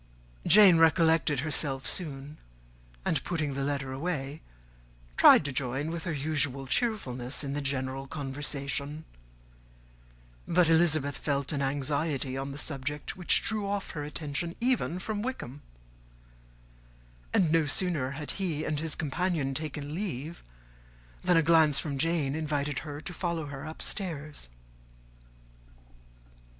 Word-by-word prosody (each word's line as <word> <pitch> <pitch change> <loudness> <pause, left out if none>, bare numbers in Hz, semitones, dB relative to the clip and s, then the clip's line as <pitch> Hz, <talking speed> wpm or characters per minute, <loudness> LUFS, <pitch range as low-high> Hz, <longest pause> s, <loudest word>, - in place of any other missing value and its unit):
Jane 190 -3 +8
recollected 160 -3 +4
herself 140 -3 -1
soon; 145 -3 -3 0.7
and 150 - 0
putting 155 -5 -2
the 135 0 -2
letter 140 -1 -2
away, 140 0 -3 0.7
tried - - +7
to 145 - -1
join, 135 +4 -1
with 165 -1 -5
her 170 - -1
usual 140 -2 0
cheerfulness, 135 - -1
in 140 -1 -3
the 145 - -2
general 135 0 -2
conversation: 140 +1 -3 1.4
but 180 -1 +4
Elizabeth 155 -4 +3
felt 140 -2 -1
an 145 -2 -2
anxiety 140 0 -1
on 135 +1 -4
the 140 - -7
subject 145 0 -3
which 180 -2 +4
drew 210 -2 0
off 200 0 -3
her 150 - -5
attention 150 +3 -3
even 240 -8 +1
from 205 +2 -3
Wickham; 150 - -5 1.7
and 170 -5 +3
no 165 -2 +3
sooner 150 -4 +1
had 150 -2 -3
he 165 -6 -2
and 150 -1 -1
his 160 -1 -3
companion 160 -2 -1
taken 150 0 -4
leave, 165 -4 -4 0.8
than 180 -2 +4
a 165 - +4
glance 160 -3 +5
from 140 -3 -1
Jane 160 -3 +1
invited 145 -3 -1
her 145 0 -7
to 165 - -7
follow 170 -2 -2
her 140 -2 -7
upstairs. 155 - -3
150 Hz, 130 wpm, -29 LUFS, 140-165 Hz, 1.7 s, Jane